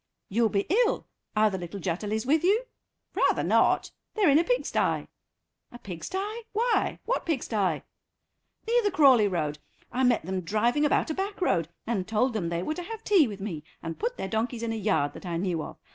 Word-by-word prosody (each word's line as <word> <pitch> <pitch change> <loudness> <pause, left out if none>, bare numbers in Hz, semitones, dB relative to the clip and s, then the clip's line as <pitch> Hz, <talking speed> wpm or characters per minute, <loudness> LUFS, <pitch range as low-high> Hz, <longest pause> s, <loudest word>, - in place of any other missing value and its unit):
"You'll 225 +2 +2
be 200 -1 0 0.2
ill. - - -2 0.3
Are 215 0 +4
the 190 - -3
little 175 +3 -6
Jutterlys 205 +6 -2
with 305 +5 +2
you?" 415 +7 +3 0.5
"Rather - - +2
not. - - +3 0.2
They're 400 -9 +4
in 285 - +6
a - - +3
pigstye." - - 0 0.6
"A 240 - -10
pigstye? 380 - -5
Why? 470 +3 +1
What - - 0
pigstye?" 215 - -1 0.8
"Near 480 +1 +4
the 415 - +2
Crawleigh 265 - +5
Road. 150 -4 -2 0.3
I 260 - 0
met 245 -8 +3
them 185 +1 -2
driving 235 - +1
about 295 - +2
a - - 0
back 390 +3 -3
road, 170 - +1 0.2
and 210 -5 -1
told 225 +3 +1
them 185 -6 -1
they 170 +1 -2
were 310 - -1
to 355 - -5
have 445 +4 -7
tea 375 -9 +5
with 205 -3 -7
me, 170 -7 -5 0.2
and 165 0 -5
put 485 +3 -2
their - - -3
donkeys 225 +3 -2
in 225 -1 -1
a - - -2
yard 175 -10 +1
that - - -11
I 170 -1 -2
knew 175 -2 -1
of. - - -8
225 Hz, 200 wpm, -27 LUFS, -, 0.8 s, in